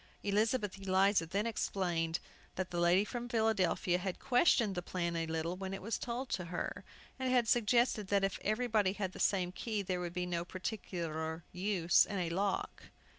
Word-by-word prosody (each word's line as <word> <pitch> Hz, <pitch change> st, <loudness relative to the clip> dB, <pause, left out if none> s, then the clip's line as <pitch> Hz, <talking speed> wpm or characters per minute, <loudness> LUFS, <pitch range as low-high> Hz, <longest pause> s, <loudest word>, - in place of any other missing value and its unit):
Elizabeth 210 Hz, 0 st, +1 dB
Eliza 190 Hz, -2 st, +3 dB
then 200 Hz, +6 st, -1 dB
explained 175 Hz, -7 st, -1 dB, 0.4 s
that 185 Hz, 0 st, -3 dB
the 175 Hz, -, -1 dB
lady 175 Hz, +4 st, +4 dB
from 240 Hz, +1 st, -5 dB
Philadelphia 220 Hz, -6 st, +2 dB
had 185 Hz, 0 st, -3 dB
questioned 245 Hz, -, +3 dB
the 180 Hz, -, -2 dB
plan 170 Hz, -1 st, -2 dB
a 165 Hz, -1 st, -1 dB
little 160 Hz, +2 st, -2 dB
when 190 Hz, +1 st, -4 dB
it -, -, -8 dB
was 225 Hz, +3 st, -2 dB
told 250 Hz, +2 st, -3 dB
her, 180 Hz, -1 st, -3 dB, 0.4 s
and 260 Hz, -1 st, 0 dB
had 245 Hz, -2 st, +3 dB
suggested 235 Hz, -2 st, +3 dB
that 200 Hz, 0 st, +2 dB
"if 195 Hz, -1 st, 0 dB
everybody 215 Hz, -3 st, +1 dB
had 195 Hz, -3 st, -3 dB
the -, -, -11 dB
same 180 Hz, -3 st, +2 dB
key 210 Hz, +2 st, -3 dB
there 180 Hz, -1 st, -2 dB
would 175 Hz, -1 st, -4 dB
be 180 Hz, 0 st, -2 dB
no 170 Hz, -1 st, -2 dB
particular 170 Hz, -4 st, -4 dB
use 180 Hz, -2 st, +3 dB
in 200 Hz, -, -3 dB
a 175 Hz, -2 st, -1 dB
lock." 195 Hz, +2 st, -2 dB
190 Hz, 175 wpm, -34 LUFS, 175-215 Hz, 0.4 s, lady